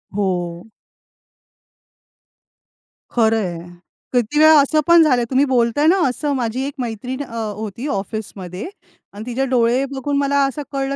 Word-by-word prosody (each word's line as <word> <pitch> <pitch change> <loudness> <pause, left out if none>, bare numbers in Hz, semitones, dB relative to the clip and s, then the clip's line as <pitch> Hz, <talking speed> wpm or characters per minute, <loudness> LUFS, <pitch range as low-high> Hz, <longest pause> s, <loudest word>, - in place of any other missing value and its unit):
हो. 180 -1 -2 2.4
खरं 225 -2 +2
आहे. 170 0 -7 0.4
किती 245 +4 +1
वेळा 310 -1 +7
असं 310 +2 +1
पण 340 -1 +7
झालं, 255 -6 +2
तुम्ही 270 +2 +3
बोलताय 255 +3 +2
ना 375 +3 +4
असं 285 +3 -2
माझी 245 0 -2
एक 285 - -6
मैत्रीण 250 +3 -4
अ, 230 -3 -10 0.2
होती 220 +5 -6
ऑफिसमध्ये 195 - -5 0.5
अन् 210 +2 -8
तिचे 250 +2 -1
डोळे 250 0 +2
बघून 280 +1 -2
मला 280 0 +2
असं 275 +2 -4
कळलं, 275 0 -2
250 Hz, 135 wpm, -19 LUFS, 220-280 Hz, 2.4 s, वेळा